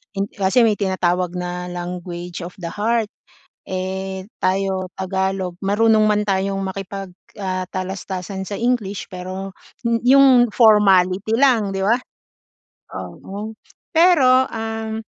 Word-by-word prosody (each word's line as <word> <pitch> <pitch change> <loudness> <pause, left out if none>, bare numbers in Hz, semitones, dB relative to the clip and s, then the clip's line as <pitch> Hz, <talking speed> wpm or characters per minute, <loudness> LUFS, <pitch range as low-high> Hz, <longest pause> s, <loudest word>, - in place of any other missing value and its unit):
hin 195 - 0
kasi 195 +4 +2
may 215 -2 +3
tinatawag 180 -2 0
na, 180 0 -4
"language 175 0 -6
of 180 - -10
the 170 - -4
heart." 220 +1 0 0.6
Eh, 190 0 -4 0.2
tayo 190 0 0
Tagalog, 190 -1 -2
marunong 215 +2 +3
man 210 0 +2
tayong 195 -1 0
makipag, 195 0 -6 0.2
ah, 185 -2 -3
talastasan 190 0 -5
sa 205 - -4
English 225 -4 -1
pero 185 +1 -6 0.3
m 230 0 +1
yung 260 -2 +7
formality 210 -2 +4
lang, 245 -5 +3
'di 190 - -1
ba? 230 +5 +3 1.0
Oo. 205 +3 -8 0.4
Pero, 280 -7 +5
um, 225 0 -4
195 Hz, 120 wpm, -20 LUFS, 185-220 Hz, 1.0 s, yung